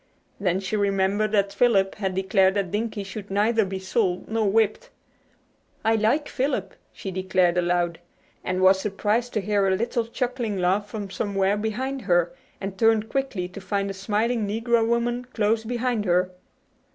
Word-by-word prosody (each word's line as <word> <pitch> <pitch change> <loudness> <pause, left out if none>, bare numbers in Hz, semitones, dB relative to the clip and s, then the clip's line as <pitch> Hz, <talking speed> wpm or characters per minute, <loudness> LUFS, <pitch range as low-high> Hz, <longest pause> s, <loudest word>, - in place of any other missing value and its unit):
Then 185 -2 +1
she 195 +2 -3
remembered 200 +1 +1
that 200 -1 +2
Philip 200 -4 +3
had 190 -3 -3
declared 190 0 +3
that 195 -3 -1
Dinkie 210 0 -2
should 200 +1 -8
neither 215 +3 +2
be 190 -1 -4
sold 190 -1 -1
nor 220 -2 +1
whipped. 225 - +1 1.0
"I 225 - +4
like 225 +8 +1
Philip," 255 -8 -2 0.2
she 195 - -6
declared 185 -1 +1
aloud, 175 -1 0 0.4
and 185 0 -1
was 190 0 +6
surprised 210 +4 -1
to 210 - 0
hear 200 0 +1
a 190 - +3
little 230 +2 -1
chuckling 240 -3 -2
laugh 190 +3 +1
from 205 -3 -6
somewhere 195 -1 0
behind 250 +6 -3
her, 175 -3 +2 0.3
and 195 -1 -6
turned 225 -1 +3
quickly 265 -10 -2
to 200 +2 -9
find 200 +1 -1
a - - -5
smiling 215 +3 0
negro 225 +2 +1
woman 240 +1 0
close 220 0 +1
behind 240 -1 -1
her. 180 0 +2
205 Hz, 165 wpm, -25 LUFS, 190-225 Hz, 1.0 s, was